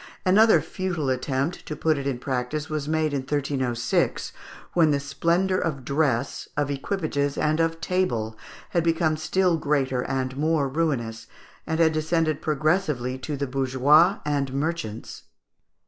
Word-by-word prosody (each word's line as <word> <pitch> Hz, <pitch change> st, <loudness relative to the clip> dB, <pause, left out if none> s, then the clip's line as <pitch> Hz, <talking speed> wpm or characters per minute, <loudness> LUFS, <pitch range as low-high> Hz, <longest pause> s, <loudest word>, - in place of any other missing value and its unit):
Another 215 Hz, +4 st, +6 dB
futile 175 Hz, -8 st, -2 dB
attempt 135 Hz, +5 st, -2 dB
to 155 Hz, -, -4 dB
put 160 Hz, 0 st, +1 dB
it 140 Hz, -1 st, -3 dB
in 135 Hz, -3 st, -1 dB
practice 130 Hz, +4 st, -3 dB
was 150 Hz, -2 st, -2 dB
made 155 Hz, -1 st, +1 dB
in 140 Hz, -, +1 dB
1306, 130 Hz, -3 st, -1 dB, 0.4 s
when 165 Hz, -3 st, +4 dB
the 145 Hz, -1 st, +2 dB
splendour 170 Hz, +6 st, +1 dB
of 140 Hz, -6 st, -3 dB
dress, 140 Hz, -3 st, 0 dB
of 145 Hz, -1 st, 0 dB
equipages, 145 Hz, -1 st, -2 dB
and 155 Hz, +1 st, +1 dB
of 165 Hz, 0 st, +1 dB
table 120 Hz, -13 st, -1 dB, 0.3 s
had 170 Hz, -, +1 dB
become 165 Hz, -1 st, +2 dB
still 170 Hz, +3 st, +1 dB
greater 135 Hz, -4 st, 0 dB
and 130 Hz, -1 st, -2 dB
more 155 Hz, -1 st, +1 dB
ruinous, 125 Hz, -7 st, -2 dB, 0.4 s
and 160 Hz, 0 st, -1 dB
had 160 Hz, -1 st, +4 dB
descended 155 Hz, -1 st, 0 dB
progressively 150 Hz, -4 st, 0 dB
to 145 Hz, +2 st, -4 dB
the 140 Hz, -, -1 dB
bourgeois 135 Hz, +8 st, +4 dB
and 140 Hz, -2 st, 0 dB
merchants. 140 Hz, -7 st, -4 dB
150 Hz, 145 wpm, -25 LUFS, 135-165 Hz, 0.4 s, Another